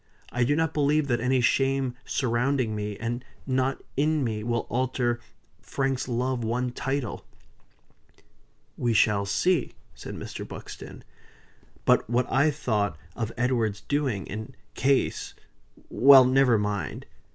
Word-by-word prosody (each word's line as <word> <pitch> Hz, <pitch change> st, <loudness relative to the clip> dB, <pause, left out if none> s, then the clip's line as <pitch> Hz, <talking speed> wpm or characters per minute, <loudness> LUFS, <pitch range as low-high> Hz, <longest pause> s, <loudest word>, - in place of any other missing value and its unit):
I 125 Hz, -, +1 dB
do 145 Hz, +4 st, +2 dB
not 160 Hz, 0 st, 0 dB
believe 150 Hz, 0 st, +2 dB
that 120 Hz, -2 st, +1 dB
any 130 Hz, +1 st, +2 dB
shame 135 Hz, 0 st, +1 dB
surrounding 125 Hz, -1 st, 0 dB
me, 105 Hz, -1 st, -4 dB
and 120 Hz, +2 st, -3 dB, 0.2 s
not 130 Hz, 0 st, 0 dB
in 150 Hz, +1 st, +1 dB
me, 110 Hz, -3 st, -2 dB
will 120 Hz, 0 st, -1 dB
alter 125 Hz, -1 st, 0 dB, 0.4 s
Frank's 135 Hz, -1 st, -2 dB
love 125 Hz, 0 st, -1 dB
one 120 Hz, +2 st, -1 dB
title." 135 Hz, -2 st, -3 dB, 1.5 s
"We 120 Hz, -2 st, 0 dB
shall 105 Hz, -2 st, +3 dB
see," 165 Hz, -, +1 dB, 0.2 s
said -, -, -8 dB
Mr. -, -, -6 dB
Buxton. -, -, -9 dB, 0.8 s
"But -, -, +3 dB
what 120 Hz, +1 st, +2 dB
I 140 Hz, +4 st, +4 dB
thought 110 Hz, -, -1 dB, 0.2 s
of 115 Hz, -1 st, -3 dB
Edward's 115 Hz, -4 st, 0 dB
doing, 135 Hz, -9 st, -1 dB
in 110 Hz, +2 st, -7 dB, 0.2 s
case 135 Hz, +1 st, 0 dB, 0.5 s
Well 135 Hz, 0 st, +7 dB
never 130 Hz, -2 st, +4 dB
mind! 105 Hz, -1 st, -3 dB
125 Hz, 130 wpm, -26 LUFS, 115-135 Hz, 1.5 s, Well